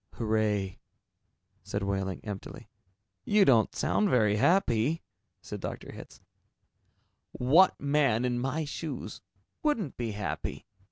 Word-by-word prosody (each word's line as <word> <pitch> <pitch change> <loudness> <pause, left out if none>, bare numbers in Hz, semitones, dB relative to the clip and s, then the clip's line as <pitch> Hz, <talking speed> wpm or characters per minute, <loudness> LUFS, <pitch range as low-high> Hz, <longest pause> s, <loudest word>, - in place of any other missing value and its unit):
"Hooray," 105 -4 0 0.8
said 100 - -4
Wehling 95 -1 -2
emptily. 105 +3 -8 0.5
"You 205 -1 +4
don't 115 -5 +4
sound 210 - +1
very 105 - +3
happy," 145 - +2 0.4
said - - -6
Dr. - - -6
Hitz. - - -12 1.1
"What 160 +10 +4
man 140 -5 +2
in 120 -1 0
my 140 +5 -1
shoes 150 +1 -6 0.4
wouldn't 235 - -1
be 115 -3 -3
happy?" 100 -1 -4
120 Hz, 110 wpm, -29 LUFS, 105-150 Hz, 1.1 s, You